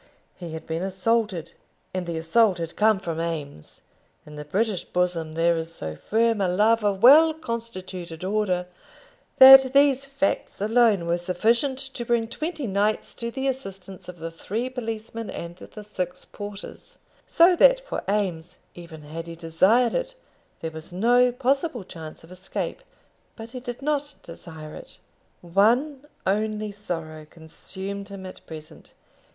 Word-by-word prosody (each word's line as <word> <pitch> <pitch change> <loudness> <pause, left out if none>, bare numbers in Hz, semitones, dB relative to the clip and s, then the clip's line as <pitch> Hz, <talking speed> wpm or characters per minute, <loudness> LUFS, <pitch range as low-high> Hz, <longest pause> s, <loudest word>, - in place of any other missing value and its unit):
He 170 -3 -8
had 160 - -7
been 165 +1 -3
assaulted, 190 -2 -1 0.4
and 185 -1 -3
the 170 -1 -3
assault 185 +4 +3
had 165 -1 -5
come 215 -2 +3
from 165 -3 -4
Eames. 150 - -6 0.4
In 150 - -11
the 150 - -6
British 195 +5 -1
bosom 175 -3 -1
there 170 +1 +2
is 165 0 -5
so 80 0 -5
firm 225 - +1
a 190 - +2
love 210 +5 +3
of 200 -2 0
well 310 +5 +8
constituted 190 - -6
order, 190 -2 0 0.7
that 265 0 +10
these 275 -1 +4
facts 275 -7 -2
alone 215 -3 +3
were 170 +1 0
sufficient 230 +10 +1
to 270 -2 -5
bring 235 -1 +1
twenty 310 +3 -4
knights 205 +1 0
to 235 - -4
the 265 +3 -3
assistance 195 -9 -6
of 180 - -9
the 165 0 -6
three 225 +9 -4
policemen 225 -2 -5
and 170 0 -7
the 210 - -11
six 180 -3 -5
porters; 205 -1 -9 0.3
so 345 +2 +5
that - - +6
for - - -5
Eames, 180 -5 -1 0.2
even 165 -3 -11
had 165 +3 -7
he 165 - -7
desired 185 +9 +3
it, - - -2 0.5
there 160 - -4
was 160 +1 -9
no 245 +7 +4
possible 265 - 0
chance 160 -4 -10
of 165 - -16
escape. 185 - -5 0.5
But 225 0 -9
he 255 - -6
did 245 +1 -7
not 290 0 -1
desire 160 -2 -10
it. - - -12 0.5
One 245 - +2 0.2
only 215 +1 -1
sorrow 165 -6 -6
consumed 190 +4 -7
him 195 -1 -8
at 185 - -10
present. 155 -1 -11
200 Hz, 155 wpm, -25 LUFS, 170-240 Hz, 0.7 s, that